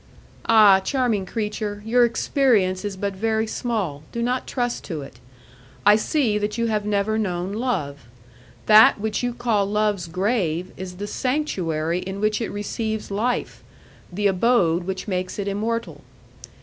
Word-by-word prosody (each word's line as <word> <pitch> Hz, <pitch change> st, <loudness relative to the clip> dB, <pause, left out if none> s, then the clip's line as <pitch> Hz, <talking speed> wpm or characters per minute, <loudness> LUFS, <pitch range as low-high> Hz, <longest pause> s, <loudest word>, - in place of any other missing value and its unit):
"Ah! 210 Hz, -4 st, +7 dB
charming 225 Hz, -3 st, 0 dB
creature, 210 Hz, -1 st, -4 dB
your 240 Hz, +2 st, +4 dB
experience 225 Hz, -7 st, +1 dB
is 205 Hz, -2 st, -4 dB
but 200 Hz, +1 st, -2 dB
very 220 Hz, +3 st, 0 dB
small; 215 Hz, -, -3 dB
do 235 Hz, -, -3 dB
not 250 Hz, +2 st, -1 dB
trust 245 Hz, -2 st, -2 dB
to 155 Hz, -6 st, -5 dB
it. 120 Hz, -, -13 dB, 0.7 s
I 205 Hz, +1 st, +8 dB
see 220 Hz, -1 st, +1 dB
that 210 Hz, +1 st, -2 dB
you 230 Hz, -, 0 dB
have 215 Hz, -2 st, -1 dB
never 210 Hz, +1 st, 0 dB
known 185 Hz, -2 st, -2 dB
love. 160 Hz, -, -3 dB, 0.6 s
That 215 Hz, 0 st, +7 dB
which 215 Hz, 0 st, -2 dB
you 245 Hz, 0 st, -1 dB
call 235 Hz, -4 st, 0 dB
love's 205 Hz, -3 st, 0 dB
grave 180 Hz, -2 st, -1 dB
is 185 Hz, -1 st, -7 dB
the 200 Hz, +3 st, -5 dB
sanctuary 180 Hz, -, -1 dB
in 190 Hz, +2 st, -6 dB
which 215 Hz, +2 st, 0 dB
it 225 Hz, -, -2 dB
receives 215 Hz, +1 st, -4 dB
life, 230 Hz, +5 st, -2 dB, 0.5 s
the 205 Hz, +3 st, -3 dB
abode 185 Hz, -4 st, +2 dB
which 190 Hz, +2 st, -4 dB
makes 185 Hz, -2 st, -3 dB
it 200 Hz, -1 st, -3 dB
immortal. 225 Hz, +4 st, -3 dB
210 Hz, 150 wpm, -23 LUFS, 185-230 Hz, 0.7 s, I